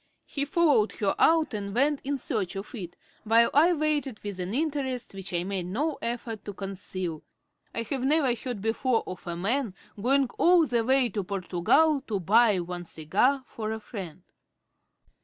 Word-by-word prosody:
He 280 -1 -2
followed 290 - +3
her 200 -2 0
out 320 -4 +4
and 200 -1 -4
went 280 +3 +2
in 280 +1 -1
search 215 - -2
of 195 +1 -6
it, 180 -8 -7 0.3
while 230 +1 +4
I 320 +5 +6
waited 295 -6 -1
with 200 -2 -5
an 180 +1 -3
interest 265 -3 -2
which 195 -1 -7
I 175 -1 0
made 190 -2 -3
no 285 - -2
effort 230 -2 -4
to 205 - -5
conceal. 185 -4 -5 0.5
I 230 - -3
had 265 +3 -3
never 275 -1 +3
heard 240 -2 -5
before 225 +1 +1
of 185 -1 -8
a 170 - -3
man 215 +4 -1 0.3
going 270 +4 +3
all 345 -1 +6
the 240 -4 +1
way 260 0 +3
to 205 -1 -3
Portugal 200 - +2
to 205 -3 -1
buy 210 +2 +4
one 175 0 -6
cigar 200 - +1
for 220 -2 -5
a 220 - -3
friend. 185 -6 -8
225 Hz, 175 wpm, -27 LUFS, 195-275 Hz, 0.5 s, I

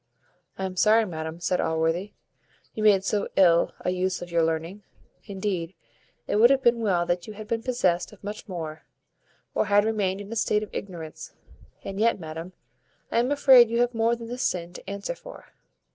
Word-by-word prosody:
"I 190 - -2
am 185 -1 -5
sorry, 220 +3 +5
madam," 160 -2 -6
said 180 +1 0
Allworthy, 165 +5 -1 0.6
"you 215 - -5
made 205 -3 +5
so 205 +1 0
ill 170 -3 +4
a 180 - -1
use 185 0 -1
of 175 0 -8
your 170 -1 +2
learning. 165 +5 -2 0.4
Indeed, 190 -3 -3 0.5
it - - 0
would 235 +3 +7
have 270 -1 +2
been 235 0 +4
well 185 -6 +1
that 175 0 -2
you 215 - -7
had 215 +1 -9
been 225 0 -1
possessed 185 -9 0
of 210 - -17
much 210 +1 -7
more, 160 -5 -6 0.7
or - - +1
had 205 0 +4
remained 200 -4 0
in 205 +1 -9
a - - -4
state 210 -1 +1
of 210 - -10
ignorance. 170 -5 -7 0.5
And 195 0 -6
yet, 230 -1 +2
madam, 165 +2 -7 0.6
I - - +2
am 245 +2 +1
afraid 265 -5 +7
you 235 +1 0
have 245 0 +1
more 230 +1 +2
than 230 -1 -9
this 245 +2 -5
sin 175 -5 -2
to 185 - -10
answer 200 - -4
for." - - -13
195 Hz, 195 wpm, -26 LUFS, 175-225 Hz, 0.7 s, would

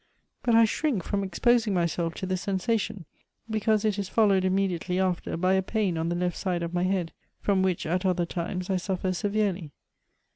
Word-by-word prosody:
But 235 -2 +2
I 230 0 +7
shrink 230 - -1
from 200 +3 -1
exposing 220 +3 +2
myself 170 -1 0
to - - -4
the 185 0 -1
sensation, 195 0 -1 0.4
because 215 -1 +1
it 210 -2 +1
is 195 -2 -3
followed 200 -4 +3
immediately 185 -1 0
after 185 -3 -1
by 185 +2 +2
a 190 - +3
pain 195 -2 -1
on 165 +1 -1
the 175 - -1
left 180 0 -1
side 180 -3 -1
of 170 +1 -4
my 180 0 +1
head, 185 -3 -1 0.3
from 195 -2 +1
which 185 -2 0
at 180 +4 0
other 180 -2 +1
times 180 +2 -4
I 190 - +2
sufier 185 0 -2
severely.' 200 -6 -1
190 Hz, 190 wpm, -27 LUFS, 175-205 Hz, 0.4 s, I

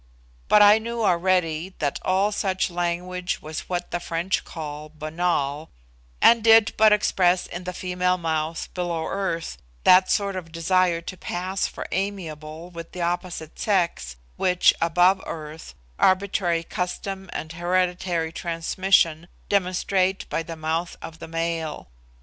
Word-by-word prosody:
But 210 - +7
I 205 +1 +7
knew 230 +1 -3
already 180 -2 +1
that 145 -2 -1
all 195 +3 +2
such 190 -2 -1
language 175 +1 -2
was 155 0 -7
what 175 -1 -3
the 175 - -1
French 170 +2 -1
call 150 -1 -7
'banal,' 155 -1 -2 0.5
and 230 -1 +6
did 225 -1 +6
but 215 0 +6
express 185 -3 +3
in 180 +1 -7
the 180 - -3
female 180 0 0
mouth, 160 -1 -2
below 170 -3 -2
earth, 190 -4 -3 0.2
that 185 +1 +6
sort 200 -1 +1
of 170 -3 -6
desire 170 +1 +2
to 185 - -7
pass 185 +2 -2
for - - -7
amiable 170 -4 -4
with 165 -1 -9
the 180 - -5
opposite 175 -2 -3
sex 175 - 0 0.2
which, 180 -1 +4
above 180 +3 +4
earth, 155 0 -8 0.2
arbitrary 185 -3 +2
custom 190 +2 -4
and 160 +1 -5
hereditary 175 -1 0
transmission 170 0 +1 0.2
demonstrate 190 0 +1
by - - -1
the 165 0 -7
mouth 160 +2 -2
of 165 0 -9
the - - -8
male. 165 - -3
175 Hz, 140 wpm, -24 LUFS, 165-185 Hz, 0.5 s, But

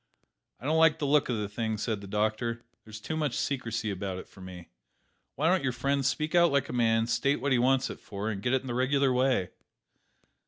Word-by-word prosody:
"I 125 - -11
don't 160 +3 +2
like 160 -1 +5
the 150 - -2
look 145 -1 +3
of 120 - 0
the 105 -1 -2
thing," 110 +1 -3
said 105 -1 -2
the 100 - -9
doctor. 110 +3 -1 0.2
"There's 110 -1 -10
too 160 +9 -4
much 150 -5 -1
secrecy 115 -5 -2
about 95 -1 -4
it - - -9
for 95 - -16
me. 90 -2 -10 0.7
Why 150 +4 +1
don't 185 +2 +3
your 130 - 0
friend 140 +3 0
speak 145 +5 -1
out 170 -2 +5
like 140 -1 +1
a - - -5
man; 115 -2 +2
state 120 +4 +1
what 140 +3 -1
he 125 - +4
wants 130 +1 +2
it - - -9
for, 105 +2 -4
and 100 -2 -5
get 120 - 0
it 130 - +2
in 135 - -10
the 120 - -3
regular 130 +2 +2
way?" 125 -7 +1
125 Hz, 235 wpm, -29 LUFS, 110-140 Hz, 0.7 s, like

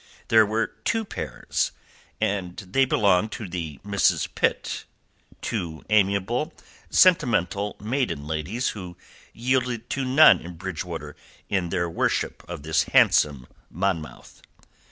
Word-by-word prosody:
There 110 -2 +6
were 110 +2 +1 0.2
two 225 -1 0
pairs, - - -3 0.5
and 95 -3 -1
they 100 +8 +1
belonged 105 -3 +2
to 110 - -6
the 80 -5 -5
Misses 100 -1 +2
Pitt, - - -1 0.6
two 80 -2 -4
amiable, 105 - +1 0.3
sentimental 105 - +3
maiden 115 - -2
ladies 80 - -2
who 90 -4 -8 0.3
yielded 125 -1 -1
to 135 - -1
none 135 +5 +7
in 85 +1 -9
Bridgewater 90 -1 -6 0.3
in 95 -3 0
their 85 -1 0
worship 85 - -1
of 85 -5 -6
the 80 0 +1
handsome 70 -4 +4 0.2
Monmouth. 90 -3 -4
100 Hz, 115 wpm, -25 LUFS, 85-120 Hz, 0.6 s, none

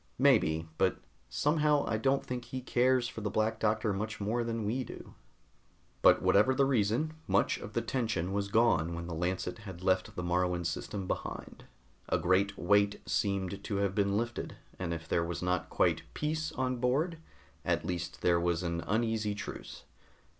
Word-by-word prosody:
"Maybe 95 - +3
but - - +3 0.3
somehow 150 -1 +2
I 110 - 0
don't 135 +4 +1
think 125 -1 -4
he 130 - -5
cares 125 0 +2
for 115 - -7
the 105 - -1
Black 110 +2 0
Doctor 110 -1 +1
much 110 +3 -4
more 110 +4 0
than 115 -2 -2
we 125 +5 0
do." - - -10 0.9
But - - +6
whatever 120 +7 +4
the 140 - +4
reason, 130 +4 +1
much - - +2
of - - -8
the - - 0
tension 110 -8 -1
was 100 0 0
gone 100 -7 +3
when 85 0 -5
the 85 - -5
Lancet 90 +3 -2
had 95 -4 -9
left 95 -1 +1
the 90 - -3
Moruan 90 0 0
system 95 +4 -3
behind. - - -5 0.4
A - - +3
great 95 +4 +2
weight 100 +2 +3
seemed 100 -1 -1
to 105 - -3
have 100 -1 +1
been 100 0 +1
lifted, 120 +1 -3 0.2
and 90 -2 -2
if 85 -1 -5
there 85 - +1
was 85 +1 -4
not 90 0 0
quite - - +2
peace 155 +1 -1
on 130 -1 -1
board, 145 +8 0 0.4
at - - 0
least 90 -1 -4
there 85 -1 +4
was 85 0 0
an 85 -1 -1
uneasy 110 -1 0
truce. - - -7
105 Hz, 175 wpm, -31 LUFS, 90-120 Hz, 0.9 s, But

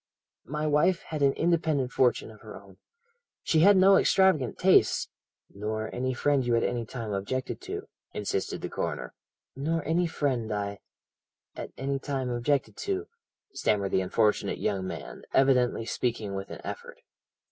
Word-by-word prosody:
My 150 +1 -2
wife 150 +4 +2
had 155 -2 -3
an 140 -1 +4
independent 160 -6 +1
fortune 125 -3 +2
of 110 - -16
her 110 - -10
own 95 -1 -18 0.7
she 160 - +2
had 200 +4 +7
no 195 +1 +7
extravagant 185 - +3
tastes - - +4 0.2
' - - -65
"'Nor 110 +2 -4
any 130 +1 -1
friend 140 +1 +2
you 120 -1 +1
at 115 - +2
any 120 -2 -1
time 115 -4 -5
objected 110 +7 -3
to?' - - -6 0.2
insisted 100 -2 -3
the - - -3
coroner. - - -4 0.4
"'Nor 155 +4 -1
any 170 +2 +2
friend, 130 -8 -1
I 100 -1 -3 0.8
at - - -6
any 135 +1 -2
time 135 -2 -3
objected 130 +4 0
to,' 400 0 -3 0.4
stammered 100 -2 0
the 95 - +2
unfortunate 105 +3 +1
young 95 -2 -1
man, - - -7
evidently 125 -4 +3
speaking 115 -4 -2
with 95 0 -5
an - - -8
effort. - - -7
130 Hz, 160 wpm, -28 LUFS, 110-150 Hz, 0.8 s, had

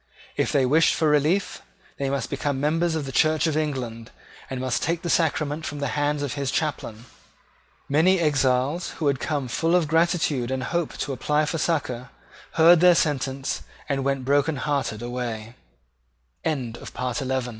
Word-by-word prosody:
If - - 0
they 135 -2 +3
wished 155 +6 +4
for 155 - +2
relief, 150 +7 +1 0.4
they 140 -1 -1
must 135 -3 -2
become 140 -1 -1
members 160 +3 +1
of 155 -3 -2
the 135 - -5
Church 155 +3 +3
of 160 -2 0
England, 125 -7 -3 0.4
and 130 - -4
must 125 -2 -1
take 170 +3 -1
the 170 - -1
sacrament 155 -2 0
from 145 0 -5
the 140 -2 -2
hands 145 0 0
of 145 - -2
his 140 -2 -2
chaplain. 125 -7 -3 0.8
Many 170 +6 +3
exiles, 145 +1 +1
who 160 - -3
had 140 -2 +2
come 140 -1 -2
full 165 +8 +1
of 175 -4 +2
gratitude 160 -6 +1
and 130 -1 -2
hope 170 +1 -2
to 140 - -3
apply 150 +4 +1
for 160 +2 -2
succour, 130 -7 -1 0.4
heard 165 +1 +7
their 180 0 +6
sentence, 135 -3 -1 0.3
and 135 -1 -1
went 135 -1 -1
brokenheart 145 0 +1
145 Hz, 155 wpm, -24 LUFS, 135-160 Hz, 0.8 s, heard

